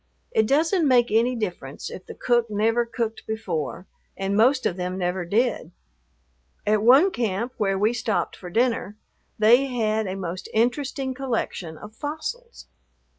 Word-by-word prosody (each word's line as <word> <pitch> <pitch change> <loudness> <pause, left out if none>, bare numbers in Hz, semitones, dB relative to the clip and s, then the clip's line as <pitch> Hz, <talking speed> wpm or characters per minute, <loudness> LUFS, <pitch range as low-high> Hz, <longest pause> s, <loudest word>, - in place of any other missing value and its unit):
It 220 -1 +2
doesn't 320 - +2
make 245 -3 +4
any 235 +3 +3
difference 175 - -5
if 185 - -9
the - - -8
cook 240 -1 +1
never 225 +3 +1
cooked 230 -1 -3
before, 185 -6 -3 0.3
and 195 +1 -1
most 255 +5 +4
of 175 - +1
them 180 0 -3
never 180 -1 -1
did. 220 -1 0 1.0
At 210 0 +2
one 270 - +6
camp, 230 - -2
where 195 -2 +1
we 215 +4 +2
stopped 225 -3 -1
for 180 - -9
dinner, 225 -1 0 0.4
they 240 +5 +5
had 220 -4 0
a 185 - -3
most 185 -1 -5
interesting 260 +3 0
collection 230 - -3
of 210 +5 -11
fossils. 315 - -6
225 Hz, 150 wpm, -24 LUFS, 195-250 Hz, 1.0 s, one